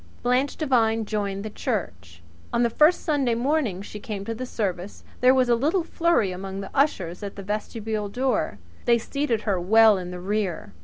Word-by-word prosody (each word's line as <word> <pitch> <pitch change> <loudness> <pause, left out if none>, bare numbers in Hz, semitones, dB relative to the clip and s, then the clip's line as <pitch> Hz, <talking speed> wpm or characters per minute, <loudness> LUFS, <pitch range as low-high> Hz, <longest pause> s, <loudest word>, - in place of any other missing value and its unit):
Blanche 250 +3 +1
Devine 225 -7 +2
joined 205 -1 -3
the 215 - -5
church. 90 - -4 0.3
On 235 - +2
the 235 - +1
first 305 +8 +4
Sunday 275 -7 +1
morning 240 - 0
she 210 - -8
came 205 -2 -6
to 230 - -3
the 255 +3 -5
service 195 -4 -4 0.2
there 250 +1 +6
was 260 -1 +3
a 240 - +4
little 305 +10 +1
flurry 335 - +1
among 190 +1 -6
the 195 - -7
ushers 190 - 0
at 200 -1 -6
the 200 - -7
vestibule 210 +1 -3
door. 240 - -1 0.3
They 235 -1 +5
seated 240 -1 -1
her 200 -5 0
well 215 +2 +6
in 180 -1 -6
the 180 0 -6
rear. 195 -1 -2
220 Hz, 190 wpm, -25 LUFS, 195-255 Hz, 0.3 s, there